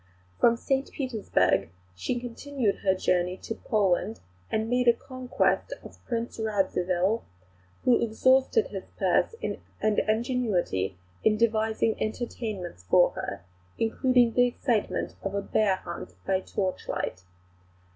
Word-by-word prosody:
From 235 0 +5
St 270 +2 -1
Petersburg 200 - +1 0.2
she 90 - -2
continued 245 -2 -2
her 190 -1 +2
journey 180 0 +1
to - - -3
Poland, 210 -1 0 0.3
and 220 0 0
made 250 +1 +1
a 235 - +8
conquest 255 - -1
of - - -13
Prince 235 -1 -3
Radzivill, 195 -1 +1 0.6
who 250 - +5
exhausted 260 - +3
his - - -6
purse - - +2
and 215 -1 -1
ingenuity 215 - 0 0.3
in 215 -1 +4
devising 220 0 +1
entertainments 215 - -4
for - - +6
her, - - -5 0.3
including 240 +1 +3
the 245 0 +5
excitement 240 -3 -1
of 195 0 -3
a 200 - 0
bear 205 -2 +2
hunt 170 - -8
by 190 - +2
torchlight. 185 - -3
220 Hz, 120 wpm, -27 LUFS, 190-245 Hz, 0.6 s, a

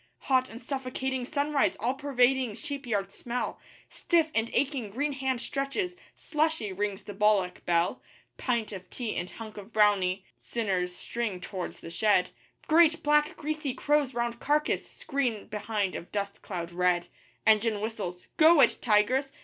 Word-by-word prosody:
Hot 255 -1 +2
and 235 +2 -10
suffocating 260 -1 -3
sunrise 285 -8 +1
all 240 +4 +1
pervading 265 -4 +2
sheep 285 -2 -5
yard 200 -3 -1
smell 245 +1 -3 0.3
Stiff 330 -3 +1
and 225 0 +1
aching 270 -6 0
green 285 +8 -1
hand 265 -2 -1
stretches 290 +9 -2 0.2
'Slushy' 305 -9 -1
rings 200 0 -2
the 205 - -7
bullock 200 -3 +2
bell 170 0 +2 0.3
Pint 235 -4 -1
of 185 -2 -8
tea 235 -4 -4
and 180 - -3
hunk 215 +5 -9
of 205 +2 -9
brownie 200 -3 +3
sinners 185 -6 -2
string 225 -2 -3
towards 185 0 -6
the 165 - -8
shed 205 -1 +3 0.4
Great, 330 0 +5
black, 300 +1 +3
greasy 305 -3 -3
crows 290 -2 +1
round 235 0 -1
carcass 300 +1 +1
screen 260 -8 -2
behind 210 -2 -2
of 170 - -7
dust 200 -1 -3
cloud 175 -3 -5
red. 180 0 +1 0.4
Engine 215 0 +4
whistles. 205 -5 -4
'Go 320 0 +7
it, - - +5
tigers! 250 +5 +3
235 Hz, 150 wpm, -29 LUFS, 200-275 Hz, 0.4 s, Go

